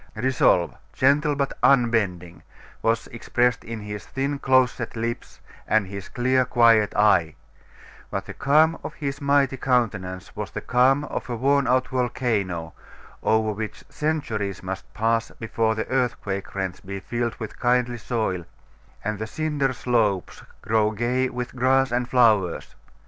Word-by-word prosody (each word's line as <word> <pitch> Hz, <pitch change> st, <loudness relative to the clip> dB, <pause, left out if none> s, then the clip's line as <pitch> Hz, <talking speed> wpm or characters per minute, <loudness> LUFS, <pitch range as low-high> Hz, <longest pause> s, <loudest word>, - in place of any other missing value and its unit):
Resolve, 115 Hz, -7 st, +2 dB, 0.2 s
gentle 145 Hz, +2 st, +3 dB
but 140 Hz, -1 st, -1 dB
unbending, 105 Hz, -10 st, +2 dB, 0.4 s
was 115 Hz, 0 st, +1 dB
expressed 120 Hz, +1 st, 0 dB
in 115 Hz, -1 st, -6 dB
his 105 Hz, -2 st, -6 dB
thin 140 Hz, +7 st, -3 dB
close 130 Hz, -2 st, +4 dB
set 120 Hz, -2 st, -6 dB
lips 115 Hz, +1 st, -4 dB, 0.3 s
and 110 Hz, -2 st, +3 dB
his 100 Hz, 0 st, -8 dB
clear 130 Hz, +1 st, +2 dB
quiet 115 Hz, -3 st, +4 dB
eye; 90 Hz, -7 st, +3 dB, 0.7 s
but -, -, -3 dB
the -, -, -8 dB
calm 155 Hz, +4 st, +3 dB
of -, -, -6 dB
his 140 Hz, 0 st, -4 dB
mighty 140 Hz, -2 st, +2 dB
countenance 105 Hz, -9 st, -1 dB
was 105 Hz, -3 st, -4 dB
the -, -, -5 dB
calm 130 Hz, +3 st, +3 dB
of 150 Hz, -, -5 dB
a 120 Hz, -, -2 dB
worn 140 Hz, +3 st, +2 dB
out 130 Hz, +1 st, +2 dB
volcano, 110 Hz, -10 st, -1 dB, 0.5 s
over 110 Hz, -1 st, +2 dB
which 105 Hz, +1 st, -6 dB
centuries 110 Hz, -, -2 dB
must 95 Hz, +1 st, -6 dB
pass 115 Hz, +1 st, 0 dB
before 115 Hz, 0 st, 0 dB
the 110 Hz, -, -3 dB
earthquake 115 Hz, -8 st, -2 dB
rents 95 Hz, -2 st, -3 dB
be 100 Hz, +1 st, -6 dB
filled 120 Hz, +3 st, -3 dB
with 110 Hz, -, -8 dB
kindly 125 Hz, -1 st, +1 dB
soil, 110 Hz, -7 st, -2 dB, 0.6 s
and 105 Hz, -1 st, -2 dB
the 110 Hz, -, -3 dB
cinder 150 Hz, 0 st, -1 dB
slopes 110 Hz, -, 0 dB, 0.2 s
grow 110 Hz, -1 st, +2 dB
gay 120 Hz, +4 st, 0 dB
with 125 Hz, +1 st, -5 dB
grass 130 Hz, +1 st, +2 dB
and 120 Hz, 0 st, -1 dB
flowers. 110 Hz, -8 st, +2 dB
120 Hz, 145 wpm, -24 LUFS, 105-130 Hz, 0.7 s, close